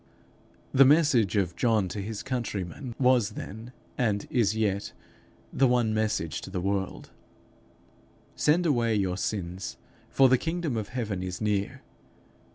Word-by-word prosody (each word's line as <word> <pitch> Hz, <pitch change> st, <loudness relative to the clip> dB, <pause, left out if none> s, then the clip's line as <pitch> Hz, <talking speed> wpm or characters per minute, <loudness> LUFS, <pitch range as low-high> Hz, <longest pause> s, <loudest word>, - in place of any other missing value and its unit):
The 135 Hz, -, +7 dB
message 135 Hz, -, +4 dB
of 95 Hz, -4 st, 0 dB
John 110 Hz, -6 st, +2 dB
to 105 Hz, -, -4 dB
his 105 Hz, +1 st, -5 dB
countrymen, 120 Hz, -, -4 dB
was 125 Hz, -5 st, +3 dB
then, 110 Hz, +5 st, -8 dB, 0.3 s
and 105 Hz, -5 st, 0 dB
is 110 Hz, -4 st, +2 dB
yet, 100 Hz, -2 st, -1 dB, 0.6 s
the 135 Hz, -, +4 dB
one 120 Hz, -3 st, +2 dB
message 105 Hz, -7 st, -1 dB
to -, -, -8 dB
the 95 Hz, -1 st, -3 dB
world: 95 Hz, +1 st, -3 dB, 1.2 s
'Send 165 Hz, +4 st, +2 dB
away 120 Hz, -7 st, +2 dB
your 95 Hz, -3 st, 0 dB
sins, 90 Hz, -8 st, -4 dB, 0.3 s
for 135 Hz, -, +5 dB
the 130 Hz, -1 st, +4 dB
kingdom 165 Hz, -5 st, -2 dB
of 110 Hz, -2 st, -3 dB
heaven 110 Hz, -7 st, -3 dB
is 90 Hz, -1 st, -5 dB
near.' 105 Hz, -2 st, -1 dB
110 Hz, 140 wpm, -27 LUFS, 100-125 Hz, 1.2 s, The